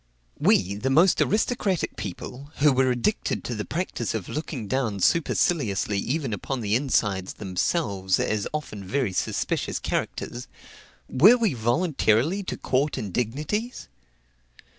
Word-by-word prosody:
We, 95 +2 +3
the 105 +7 -2
most 165 +7 +4
aristocratic 210 -4 +1
of - - -30
people, 125 - -7
who 145 -1 +4
were 130 0 +3
addicted 125 - 0
to 125 - -4
the 105 -2 -4
practice 155 -10 -3
of 105 -5 -4
looking 150 -6 -4
down 115 -5 -1
superciliously 115 - +1
even 135 +1 -2
upon 125 +6 -3
the 105 -1 -1
insides 105 -7 +1
themselves 95 - -1
as 105 -2 0
often 145 -10 -5
very 120 0 -1
suspicious - - -1
characters, - - -3 0.6
were 195 - +6
we 225 -5 +1
voluntarily 130 - +1
to - - -4
court 140 +3 0
indignities? 140 - -3
130 Hz, 130 wpm, -25 LUFS, 105-155 Hz, 0.6 s, were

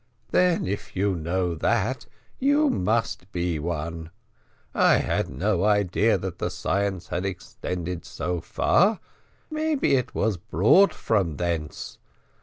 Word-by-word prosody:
"Then 180 - +3
if 100 +2 -5
you 95 0 +1
know 85 +2 -1
that, 80 - 0 0.3
you 290 +2 +3
must 110 -1 -1
be 85 -3 -1
one. 80 0 -4 0.6
I - - +5
had - - 0
no 100 -2 0
idea 105 +1 +3
that 95 -3 -6
the - - -1
science 100 -3 -2
had 90 - -2
extended 90 -2 -5
so 90 -1 -3
far 195 - +2 0.5
maybe 310 - +1
it 125 -2 -2
was 110 -3 +1
brought 105 - +4
from 95 -9 0
thence. 85 -4 -3
95 Hz, 125 wpm, -25 LUFS, 85-115 Hz, 0.6 s, I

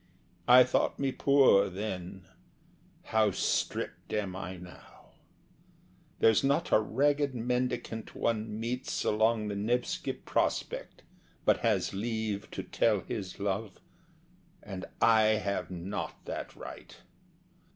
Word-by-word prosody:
I 125 +1 +9
thought - - 0
me 135 -1 0
poor 135 -8 +5
then. 95 -2 -5 0.8
How 110 -1 +2
stript 95 - -2
am 100 -4 -2
I 95 -1 -6
now! 90 0 -14 1.1
There's 110 +2 +4
not 140 +5 +1
a - - +6
ragged 140 +5 +1
mendicant 125 -2 -2
one 110 -1 -1
meets 120 +3 -2
Along 110 0 +2
the 105 - -2
Nevski 120 +5 -1
Prospekt - - -2 0.4
but - - +4
has - - +1
leave 110 -1 -3
To - - -5
tell 105 -4 +1
his 95 +2 -6
love, 100 +1 -3 0.8
and 95 -2 -6
I 110 -1 +5
have 100 -3 -2
not 95 +3 -5
that - - -6
right! - - -10
110 Hz, 115 wpm, -30 LUFS, 100-120 Hz, 1.1 s, I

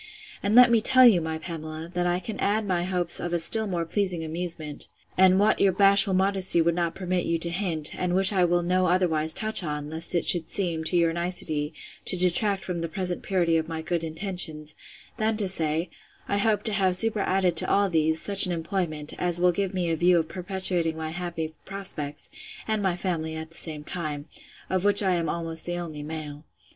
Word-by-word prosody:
—And 205 +2 -1
let 250 0 +7
me 230 -2 +3
tell 255 +3 +6
you, 205 -8 +5
my 160 0 -4
Pamela, 160 -1 -8
that 175 0 -1
I 175 0 -1
can 205 +3 -8
add 215 +2 -1
my 175 -2 -1
hopes 180 -2 +3
of 175 0 -5
a - - +1
still 220 +6 +2
more 175 -3 -3
pleasing 180 -2 0
amusement, 160 -2 -5 0.3
and 190 0 +4
what 210 +2 +2
your 195 - +4
bashful 195 0 +3
modesty 190 -2 +3
would 170 +1 +1
not 170 -1 -3
permit 185 -1 -3
you 165 - 0
to 170 +1 -2
hint; 170 -5 -2
and 180 -1 -2
which 190 +2 +7
I 185 -2 +2
will 175 0 +1
no 185 +1 0
otherwise 165 -3 +1
touch 215 +3 +2
upon, 150 -2 -6
lest 165 +2 -3
it 170 - 0
should 170 -3 +5
seem, 170 -5 0
to 175 - +1
your 165 -1 +1
nicety, 165 -3 0 0.3
to 185 - +2
detract 190 +2 0
from 175 -2 -5
the 165 - -4
present 180 +1 0
purity 170 -4 0
of 160 0 -3
my 160 -1 -6
good 170 0 -3
intentions, 160 -2 -2 0.4
than 220 -1 -1
to 205 -3 -1
say, 165 -1 0 0.4
I 200 - -1
hope 215 0 0
to 220 - -3
have 190 -2 +1
superadded 195 -4 0
to - - +3
all 200 0 +2
these, 160 -2 +1
such 200 -1 +8
an - - -3
employment, 165 -3 -4
as 175 -1 0
will 180 0 +3
give 195 +1 -3
me 180 -3 -2
a - - 0
view 175 +2 +2
of 160 -1 -1
perpetuating 180 -3 -2
my 160 0 -5
happy 170 -2 -6
prospects, 185 -7 -4 0.4
and 220 -1 -1
my 190 -3 -1
family 165 -4 -4
at 160 0 -8
the 165 - -8
same 155 -3 -2
time; 150 -3 -6 0.4
of 185 -1 -2
which 205 0 +5
I 190 -2 +1
am 170 -3 -2
almost 165 -1 -5
the 175 0 -4
only 160 -4 -7
male. 150 -1 -8
175 Hz, 215 wpm, -25 LUFS, 160-190 Hz, 0.4 s, such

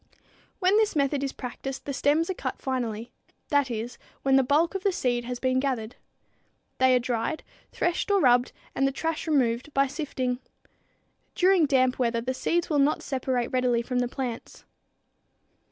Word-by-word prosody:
When 375 +1 +3
this 435 -4 +2
method 280 -1 +1
is 275 - -1
practiced 265 +1 -6
the 280 - -3
stems 295 +5 +2
are - - -1
cut - - -4
finally; 235 -4 -3 0.4
that 285 -2 +2
is, 230 +1 -5 0.2
when 270 0 +4
the 270 - +6
bulk 295 +7 +2
of 390 - -3
the 395 - +2
seed 245 -7 -1
has 250 0 -4
been 255 0 +1
gathered. 250 -4 -2 0.8
They 260 0 +5
are - - +4
dried, 240 +4 -2 0.3
threshed 350 +4 -1
or 400 -1 +4
rubbed 245 -5 +4 0.2
and 270 - +2
the - - 0
trash 320 +4 -3
removed, 255 -3 +1
by 275 0 +4
sifting. 260 -3 -3 1.0
During 365 -3 +4
damp 255 -2 +2
weather 235 -2 +1
the 255 +2 -2
seed 340 +6 0
will 295 -3 +1
not 285 +2 +2
separate 255 -2 -1
readily 250 -2 +1
from 250 +1 -1
the 245 - +1
plants. 245 -2 -6
265 Hz, 170 wpm, -27 LUFS, 245-295 Hz, 1.0 s, the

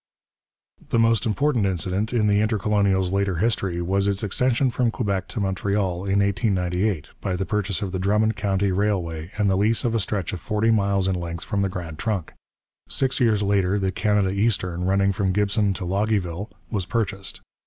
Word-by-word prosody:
The - - +1
most 115 -1 +3
important 120 -1 +1
incident 95 +4 -1
in 115 -3 +2
the 100 0 +3
Intercolonial's 100 -3 +1
later 100 -1 0
history 95 -3 0
was 100 +3 +1
its 100 +1 0
extension 125 +5 +1
from 120 0 +1
Quebec 100 -5 -2
to 115 - -5
Montreal 95 -1 -1
in 100 +1 +2
1898, 95 - 0
by 95 - -1
the 95 +1 -2
purchase 105 -1 -1
of 95 - -3
the 95 - -3
Drummond 105 +3 +2
County 100 -1 0
Railway 90 -5 -1
and 105 -1 +2
the 95 - +3
lease 110 +5 +1
of 115 - +1
a 115 - +2
stretch 95 -3 -2
of 90 - -4
forty 110 +3 +1
miles 100 -3 +2
in 95 - +1
length 85 -2 -4
from 100 - -1
the 100 - +1
Grand 85 -4 -6
Trunk. 100 -7 -2 0.6
Six 135 +1 0
years 110 -5 +3
later 100 -1 +2
the 95 -1 0
Canada 105 0 +1
Eastern, 90 -4 0
running 100 +1 +2
from 95 -1 0
Gibson 105 +1 +1
to 90 - -5
Loggieville, 100 0 -1 0.2
was 100 -5 -2
purchased. 100 -5 -2
100 Hz, 185 wpm, -24 LUFS, 95-105 Hz, 0.6 s, most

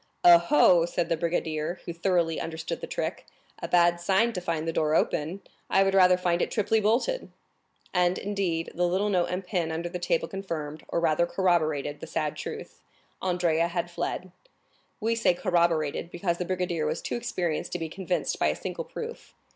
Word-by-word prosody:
"Oh, 170 -1 +7
oh," 165 +3 +6
said 175 -1 -1
the 165 - +2
brigadier, 165 0 -2
who 170 - -4
thoroughly 170 -2 +1
understood 160 0 -5
the - - -5
trick; - - -4 0.3
"a - - -3
bad 175 -1 +3
sign 200 +6 +2
to 180 - -3
find 165 -2 -2
the 165 - -1
door 155 0 +1
open! 165 +5 0 0.3
I 195 - +4
would 195 0 +1
rather 185 -1 +6
find 175 -1 0
it - - 0
triply 220 0 +1
bolted." 250 - +1 0.6
And, 180 0 +2
indeed, 190 -5 -2
the 175 +1 +1
little 190 +4 +1
note 180 -3 +2
and 180 +2 -3
pin 175 -3 -1
upon 160 +1 -3
the 180 - -4
table - - 0
confirmed, 160 -6 -5
or - - -1
rather 170 +1 +2
corroborated, 155 -6 0
the 165 - -8
sad 155 -2 -2
truth. - - -7 0.4
Andrea 175 -3 +1
had 175 0 -3
fled. 175 +1 -4 0.7
We 225 +1 +1
say 230 -6 +2
corroborated, 170 -4 +1
because 175 -1 -2
the 180 - -1
brigadier 175 -4 -1
was - - -3
too - - -3
experienced 185 -10 -2
to - - 0
be 165 -2 -4
convinced 180 +2 -2
by - - +3
a - - +1
single - - -5
proof. 465 0 -8
175 Hz, 185 wpm, -27 LUFS, 165-190 Hz, 0.7 s, Oh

